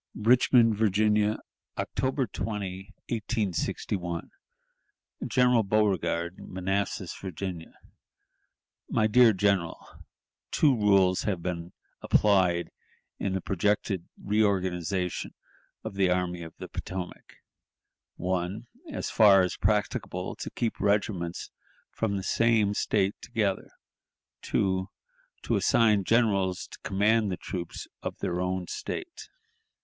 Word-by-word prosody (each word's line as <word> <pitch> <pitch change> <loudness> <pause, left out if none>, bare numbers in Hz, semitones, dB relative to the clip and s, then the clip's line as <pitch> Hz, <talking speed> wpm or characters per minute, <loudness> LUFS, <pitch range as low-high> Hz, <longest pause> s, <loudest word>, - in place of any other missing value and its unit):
"Richmond, 115 0 +4
Virginia, 105 0 +2 0.4
October 130 0 -1
20, 100 -3 -5 0.2
1861. 100 -5 -2 1.0
"General 125 -3 +4
Beauregard, 95 -4 0
Manassas, 95 +2 -3
Virginia. 90 -2 -6 1.2
"My 110 - +2
Dear 115 +2 +6
General:... 95 -4 -1 0.5
Two 145 -4 +3
rules 100 -4 +4
have 95 -5 -2
been 85 -1 -4 0.3
applied 95 -4 +3 0.5
in 100 - -1
the 95 - -1
projected 100 -1 -1
reorganization 95 -3 0 0.5
of - - -5
the 95 -1 +2
Army 90 -1 0
of 80 -1 -9
the - - -7
Potomac: 90 -1 -7 0.8
"1. 90 +4 -2 0.3
As - - -4
far 100 -4 +7
as 90 - -1
practicable, 105 -2 -1
to - - -5
keep 115 -2 -3
regiments 100 -4 -1 0.4
from 100 -3 -1
the 95 - -4
same 110 -1 +2
State 100 -1 +1
together; 105 -6 -1 0.7
2. 95 0 0 0.5
To - - 0
assign 105 -4 +3
generals 100 -5 +2
to - - -11
command 105 +1 +2
the 90 - -2
troops 85 -3 -6
of - - -5
their 90 0 -2
own 90 0 -1
State. 360 - -6
100 Hz, 105 wpm, -28 LUFS, 90-110 Hz, 1.2 s, far